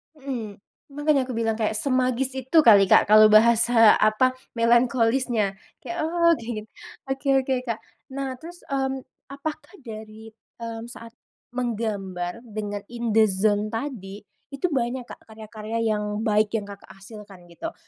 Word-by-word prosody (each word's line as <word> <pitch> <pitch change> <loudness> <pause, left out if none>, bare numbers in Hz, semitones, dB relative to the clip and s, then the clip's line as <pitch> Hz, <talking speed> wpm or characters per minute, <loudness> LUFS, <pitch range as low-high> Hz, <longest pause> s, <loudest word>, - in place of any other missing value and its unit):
Mmm, 250 -7 -6 0.4
makanya 290 -2 +1
aku 255 - -6
bilang 225 -1 -1
kayak 220 -1 0
semagis 255 +1 0
itu 260 +6 -1
kali, 205 -8 +7
Kak, 195 - +4
kalau 215 0 +8
bahasa 230 0 +6
apa, 255 +5 +2 0.2
melankolisnya, 235 -3 +2 0.2
kayak 345 - -6
oh, 335 +1 +2
kayak 230 +1 -6
gini. - - -4 0.5
Oke 270 +1 -4
oke, 265 0 -1
Kak. 230 -2 -3 0.3
Nah 265 -2 -4
terus, 345 +4 -12
mmm, 270 -1 -1 0.3
apakah 305 +6 -6
dari, 220 -1 -10 0.3
mmm, 230 0 -6
saat 230 -1 -11 0.4
menggambar 215 -4 -4
dengan 205 -2 -5
in 235 -1 -4
the 220 0 +6
zone 205 +1 +1
tadi 215 -6 -6 0.3
itu 275 +6 -1
banyak, 255 -3 -1
Kak, - - -12
karya-karya 220 0 -6
yang 210 -1 -1
baik 215 -1 +1
yang 210 -3 -1
Kakak 200 0 -12
hasilkan 195 -3 -13
gitu? 325 - -7
230 Hz, 145 wpm, -24 LUFS, 215-260 Hz, 0.5 s, kalau